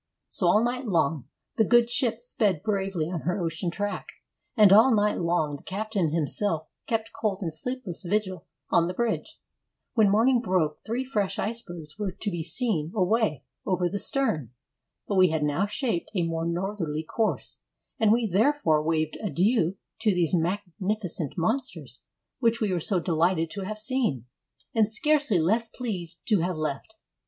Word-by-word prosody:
So 180 - 0
all 210 +6 +5
night 250 +2 -1
long 160 - +1 0.3
the 220 - +5
good 235 +2 +4
ship 240 -1 0
sped 205 -9 0
bravely 195 -6 -1
on 175 - -2
her 180 +3 -1
ocean 170 0 -2
track, 205 +4 -3 0.5
and 205 -3 +7
all 225 +6 +7
night 210 0 +2
long 170 -4 0
the - - -18
captain 200 -3 -2
himself 160 +2 +1 0.2
kept 225 -1 -1
cold 205 -2 -2
and 165 -3 -3
sleepless 250 +1 -5
vigil 190 -1 -2 0.2
on 170 0 +4
the 180 - -4
bridge. 235 0 -2 0.5
When 220 -4 +4
morning 235 +4 +4
broke, 175 -7 0
three 240 +4 -2
fresh 210 -7 -1
icebergs 175 -7 -6
were 205 -3 -1
to 200 +3 -4
be 170 -2 -3
seen 165 - 0
away 195 - +1 0.2
over 180 -2 0
the 200 +3 -3
stern. 165 - 0 0.6
But 200 - -1
we 185 -1 +6
had 155 -1 0
now 150 +7 +1
shaped 210 -4 -2
a 180 - +2
more 165 0 -2
northerly 170 -3 -2
course; 220 +7 -2 0.4
and 220 -2 +4
we 235 +1 +3
therefore 205 - +2
waved 155 0 -1
adieu 195 - +1 0.2
to 215 -4 +2
these 175 -2 +1
magnificent 185 -1 -2
monsters 175 - -2 0.4
which 230 -2 +2
we 210 -4 0
were 175 - 0
so 185 +3 +2
delighted 165 0 +1
to 200 -2 -5
have 215 +2 -4
seen, 215 - 0 0.5
and 220 -2 +3
scarcely 285 0 +2
less 220 +8 +1
pleased 185 -9 -5
to 210 -4 +4
have 175 +2 -1
left. 155 - -4
190 Hz, 165 wpm, -26 LUFS, 165-220 Hz, 0.6 s, and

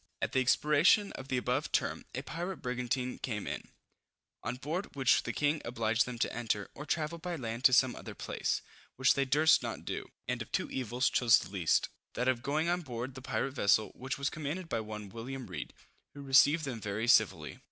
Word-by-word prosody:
At - - -1
the 130 - +2
expiration 150 - +4
of 135 - -8
the 130 - 0
above 125 0 -1
term, - - 0
a - - -3
pirate 175 +4 -4
brigantine 125 0 -2
came 105 -5 -3
in, - - -5 0.7
on - - -3
board 155 +9 -4
which 135 -3 +4
the 120 - -3
king 145 +4 0
obliged 115 -2 +1
them 125 -1 -5
to 115 - -1
enter, 110 -4 -2
or 150 - -9
travel 165 +1 -1
by 175 +1 -4
land 120 -4 -5
to 130 - +8
some 130 -1 +4
other - - -8
place, - - -2 0.3
which 130 0 +4
they 140 - +1
durst 150 +4 +5
not - - -5
do; - - -4 0.2
and - - -1
of - - -7
two - - -1
evils 125 0 0
chose 120 -3 +5
the - - -6
least, 90 -5 +2 0.3
that 125 - 0
of 130 -2 +2
going 150 +5 0
on 175 +1 +1
board 125 -3 -5
the 130 - -9
pirate 135 +1 -2
vessel, 105 -3 +3
which 130 +1 -5
was 140 0 -1
commanded 155 +4 -4
by 115 - -1
one 105 -1 -6
William 125 +6 -6
Read, 75 -9 -6 0.4
who 140 - -8
received 145 +4 +5
them 120 -5 -5
very 105 +3 -2
civilly. - - +3
130 Hz, 205 wpm, -32 LUFS, 120-145 Hz, 0.7 s, to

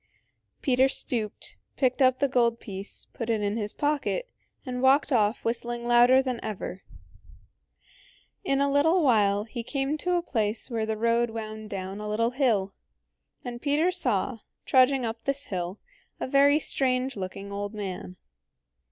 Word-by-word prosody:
Peter 260 0 +4
stooped, 225 -5 -2 0.2
picked 260 0 +1
up 255 -1 +5
the 280 - +2
gold 235 -3 +2
piece, 195 -1 -6
put 230 -1 -5
it 225 -2 +1
in 205 +1 0
his 210 -2 -2
pocket, 300 - -1 0.4
and 250 -1 -4
walked 270 +3 +4
off 215 -3 +1
whistling 240 +1 -2
louder 245 +2 +6
than 255 -3 -2
ever. 195 -3 -5 1.6
In 275 -8 +1
a 280 0 +2
little 320 +5 +3
while 205 -6 +3
he 235 +2 -6
came 275 +5 -2
to 360 +2 0
a 345 - 0
place 220 -3 -2
where 225 -2 -1
the 220 0 -2
road 235 +1 +2
wound 215 -1 -6
down 195 0 -5
a 210 0 -5
little 230 +3 +1
hill, 225 -8 +1 0.7
and 240 -1 -6
Peter 305 +5 +2
saw, 250 - 0 0.3
trudging 260 0 +4
up 230 0 -5
this 275 +1 -1
hill, 180 0 -4 0.4
a - - -2
very 280 +2 +5
strange 260 -3 0
looking 195 +1 -6
old 205 +1 -4
man. 190 -2 -6
240 Hz, 155 wpm, -27 LUFS, 210-270 Hz, 1.6 s, louder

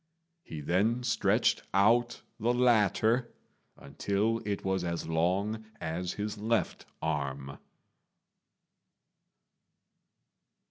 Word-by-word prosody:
He 80 - -8
then 105 +10 +1
stretched 115 -2 +2
out 120 +5 +3 0.2
the 120 +2 +1
latter 120 0 +2 0.4
until 100 +10 -1
it 100 -1 -3
was 95 -1 0
as 85 -1 -3
long 95 +7 0 0.2
as 85 +2 -3
his 105 0 -4
left 115 +2 -1 0.2
arm. 70 -3 -3
100 Hz, 85 wpm, -30 LUFS, 85-115 Hz, 0.4 s, out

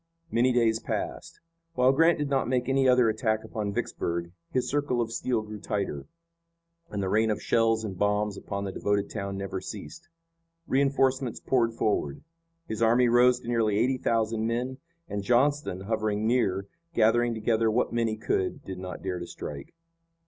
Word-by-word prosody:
Many 125 +2 +3
days 115 -2 +2
passed. - - -4 0.4
While 125 -1 +5
Grant 165 +5 +4
did 145 -1 -1
not 135 -4 +1
make 125 -1 0
any 135 0 +3
other 125 -2 +5
attack 110 0 0
upon 105 -2 -3
Vicksburg 85 -3 -3 0.2
his 130 - 0
circle 145 -4 0
of 115 -1 -1
steel 120 -1 -1
grew 105 0 -8
tighter, 100 -9 -3 0.8
and 100 -2 -3
the - - -1
rain 110 +3 +2
of 105 - 0
shells 115 -1 +2
and 100 -3 -4
bombs 105 0 +1
upon 100 0 -5
the 100 - -3
devoted 100 +1 -1
town 100 0 -4
never 95 -1 -4
ceased. 75 - -9 0.6
Reinforcements 135 -3 +1
poured 115 -3 +1
forward. 75 -11 -1 0.4
His 110 0 -4
army 120 +2 +4
rose 125 +1 +5
to - - -12
nearly 115 -4 +1
eighty 130 +4 +2
thousand 115 -1 0
men, 125 +3 -2 0.3
and 100 - -3
Johnston, 125 -2 +1
hovering 110 0 -1
near, 100 -5 +1 0.3
gathering 115 +1 +3
together 110 0 +1
what 120 +3 0
men 115 -1 +1
he 110 0 -2
could, 95 -3 -1
did 95 -1 -6
not 90 0 -7
dare 90 -2 -2
to 85 - -6
strike. 70 -4 -7
110 Hz, 170 wpm, -27 LUFS, 100-125 Hz, 0.8 s, While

